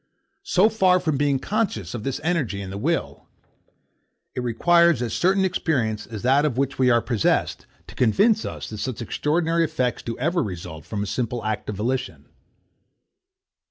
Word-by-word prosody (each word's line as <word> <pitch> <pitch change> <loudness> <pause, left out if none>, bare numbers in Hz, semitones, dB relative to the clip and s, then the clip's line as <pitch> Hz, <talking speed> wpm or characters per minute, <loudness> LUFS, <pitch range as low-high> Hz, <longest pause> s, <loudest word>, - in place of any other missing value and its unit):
So 185 +4 +3
far 190 -5 +3
from 160 -5 -1
being 140 0 +2
conscious 135 - -2
of 120 - -4
this 135 +1 -2
energy 150 - -1
in 95 -1 -6
the 100 - -5
will, - - -2 1.1
it 125 - -3
requires 170 +6 +3
as 120 -2 -3
certain 190 +2 +2
experience 125 - -1
as 110 -2 -7
that 135 +3 +4
of 145 -5 0
which 135 0 -1
we 130 -1 +4
are 120 -1 +3
possessed, 115 -5 0 0.2
to - - -12
convince 205 - +3
us - - -6
that 110 - -6
such 120 0 -3
extraordinary 165 +7 0
effects 130 -6 -1
do 115 - -5
ever 170 +6 0
result 85 - -6
from 100 +2 -3
a - - -3
simple 120 +2 -3
act 110 -1 -3
of 105 - -3
volition. 125 +6 -3
130 Hz, 170 wpm, -23 LUFS, 110-170 Hz, 1.1 s, that